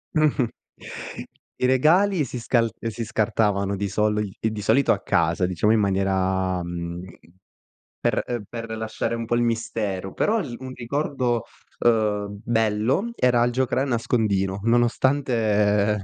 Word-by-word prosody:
Mh-mh. 145 -6 +2 1.1
I 125 - +2
regali 160 +7 +4
si 125 0 -6
scal 115 -1 +1
ehm, 115 - -3
si 115 +1 -5
scartavano 105 -3 0
di 100 +1 -2
soli 105 +1 0
i 110 - 0
di 105 -1 -5
solito 135 +6 +3
a - - +1
casa, 90 - +1
diciamo 95 +4 +1
in 110 - +4
maniera 95 -2 0
mhmm, 85 0 -5 1.0
per - - +1
ehm, 120 -3 -3
per 115 -1 -7
lasciare 110 +1 -2
un 115 0 -4
po' 120 - -2
il 120 - +2
mistero. 110 -5 -2
Però 225 +2 +1
l 125 - -5
un 130 0 -7
ricordo, 125 -2 -1 0.3
uhm, 105 -3 +1
bello 115 - +1
era 125 - +3
il 120 - +1
giocare 130 +1 0
a 140 - +1
nascondino, 105 -6 0
nonostante 115 -4 +2
115 Hz, 145 wpm, -24 LUFS, 100-120 Hz, 1.1 s, regali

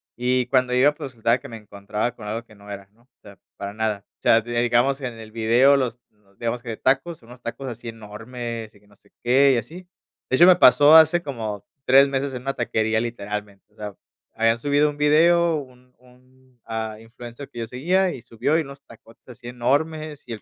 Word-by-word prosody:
y 125 +1 0
cuando 125 0 +1
iba, 135 +4 +4
pues 140 -2 -8
resultaba 115 +1 +1
que - - -11
me 115 - -8
encontraba 105 +2 -4
con 110 - -11
algo 110 +3 -5
que 110 - -19
no 100 0 -13
era, 100 -1 -8
¿no? 115 - -29
O 125 0 -41
sea, 100 -1 -15 0.2
para 100 0 -6
nada. 105 -2 -2
O - - -56
sea, 115 - +5
digamos 120 +4 +1
en 125 -3 -5
el 110 -1 -12
video 120 +5 +4
los 125 -3 -1
los 100 -2 -32
digamos 120 +1 -3
que 115 -3 -6
tacos, 135 +5 0
unos 120 +1 -15
tacos 120 +3 -6
así 120 -1 -7
enormes 115 +1 -8
y 100 - -21
que 105 - -28
no 100 - -23
sé 100 0 -29
qué 135 +3 +4
y - - +1
así. 165 - -7 0.4
De 130 - +2
hecho, 170 - +8
me 185 - +8
pasó 145 -1 +7
hace 160 +2 +6
como 110 - -6 0.2
3 135 +2 +6
meses 135 0 -2
en 125 -1 -7
una 135 +1 -2
taquería 110 -3 0
literalmente, 105 -3 -6
o - - -32
sea, 105 -2 -8 0.4
habían 115 +1 +2
subido 145 +3 +2
un 145 - -8
video, 165 +3 +4
un 125 -3 -12
un 125 +1 -24 0.3
ah, 110 -1 -4
influencer 120 +4 -11
que 120 - -10
yo 115 - -4
seguía 180 +10 0
y 125 - -9
subió 120 +6 -1
y - - +1
unos 140 -2 -10
tacotes 115 0 -19
así 120 -1 -12
enormes 150 +5 -2
y 120 - -7
el 110 - -8
120 Hz, 220 wpm, -23 LUFS, 110-135 Hz, 0.4 s, hecho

